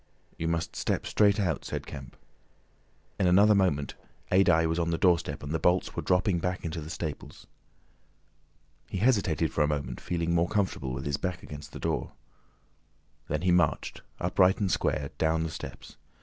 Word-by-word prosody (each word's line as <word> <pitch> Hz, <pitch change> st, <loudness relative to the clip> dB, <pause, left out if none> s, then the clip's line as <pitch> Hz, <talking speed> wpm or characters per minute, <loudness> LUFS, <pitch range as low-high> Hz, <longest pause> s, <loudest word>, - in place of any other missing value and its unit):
"You 80 Hz, -, -3 dB
must 85 Hz, 0 st, -2 dB
step -, -, -1 dB
straight 105 Hz, -1 st, +3 dB
out," 85 Hz, -7 st, 0 dB
said -, -, -4 dB
Kemp. 65 Hz, -3 st, -9 dB, 1.0 s
In 95 Hz, -, +3 dB
another 100 Hz, +4 st, +6 dB
moment 90 Hz, -8 st, +1 dB, 0.4 s
Adye 90 Hz, -3 st, +5 dB
was 80 Hz, +1 st, -1 dB
on 85 Hz, 0 st, 0 dB
the 85 Hz, -, 0 dB
doorstep 90 Hz, -3 st, +1 dB
and 70 Hz, -, -5 dB
the 80 Hz, -, 0 dB
bolts 90 Hz, +1 st, +1 dB
were -, -, -2 dB
dropping 90 Hz, 0 st, +2 dB
back 90 Hz, +1 st, -3 dB
into 80 Hz, 0 st, -3 dB
the 75 Hz, -, -8 dB
staples. 75 Hz, -3 st, -6 dB, 1.4 s
He -, -, -3 dB
hesitated 95 Hz, -8 st, +2 dB
for 75 Hz, -, +2 dB
a -, -, +2 dB
moment, 70 Hz, -5 st, -3 dB
feeling 85 Hz, -1 st, -1 dB
more 85 Hz, +1 st, +2 dB
comfortable 95 Hz, -10 st, -1 dB
with 65 Hz, +1 st, -5 dB
his 70 Hz, 0 st, 0 dB
back 90 Hz, -2 st, -4 dB
against 75 Hz, 0 st, -9 dB
the -, -, -8 dB
door. -, -, -2 dB, 1.1 s
Then -, -, -2 dB
he 90 Hz, -, +3 dB
marched, 85 Hz, -5 st, +1 dB, 0.2 s
upright 90 Hz, +1 st, +3 dB
and 100 Hz, -3 st, 0 dB
square, 70 Hz, -3 st, 0 dB
down 80 Hz, 0 st, +2 dB
the 80 Hz, -, -3 dB
steps. -, -, -9 dB
85 Hz, 175 wpm, -28 LUFS, 75-90 Hz, 1.4 s, another